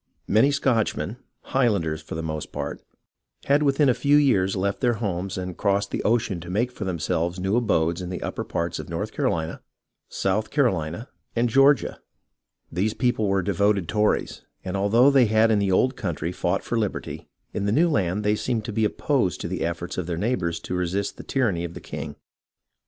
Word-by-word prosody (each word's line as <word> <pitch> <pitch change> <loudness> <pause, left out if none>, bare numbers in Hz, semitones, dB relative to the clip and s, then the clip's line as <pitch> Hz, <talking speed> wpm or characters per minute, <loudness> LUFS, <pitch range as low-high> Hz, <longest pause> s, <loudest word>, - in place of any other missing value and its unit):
Many 110 +7 +4
Scotchmen, 125 -5 0 0.2
Highlanders 100 -12 0
for 80 - -7
the 80 - -3
most 80 -1 -4
part, - - -5 0.6
had 140 +2 +3
within 140 0 +3
a 130 - +5
few 145 +4 +3
years 100 -10 +3
left 100 +1 -1
their 120 -2 +2
homes 100 -3 -3
and 90 -1 -4
crossed 100 0 0
the - - -2
ocean 110 -5 +1
to 85 +1 -9
make 115 +7 0
for 105 - -6
themselves 85 0 -1
new 95 +3 0
abodes 85 -8 +1
in 90 - -5
the 90 - -5
upper - - -3
parts 85 0 -3
of - - -7
North - - -3
Carolina, 80 -1 -1 0.5
South 105 +3 -1
Carohna, 105 - 0 0.3
and 120 +1 +2
Georgia. 135 +3 +4 0.7
These 100 +6 0
people 115 -2 +1
were 95 -1 +1
devoted 100 -1 +1
Tories, 105 +3 0 0.2
and 95 +1 -3
although 115 +8 +4
they 135 -3 +5
had 110 +1 +4
in 105 - +3
the 100 -1 +1
old 130 +7 +3
country 85 -4 -3
fought 90 +1 -1
for 120 - -1
liberty, 105 -3 -4 0.3
in 100 - -2
the 100 - +1
new 160 +10 +4
land 100 - 0
they 105 +1 +2
seemed 110 -1 -2
to 110 - -4
be 110 0 +2
opposed 120 - 0
to - - -3
the 90 +1 -4
efforts 85 +2 -3
of 90 - -3
their 85 -2 -2
neighbours 85 -5 -1
to - - -5
resist 90 +3 -1
the - - -8
tyranny 105 -11 0
of 85 -1 -6
the - - -6
king. - - -7
100 Hz, 195 wpm, -24 LUFS, 90-120 Hz, 0.7 s, a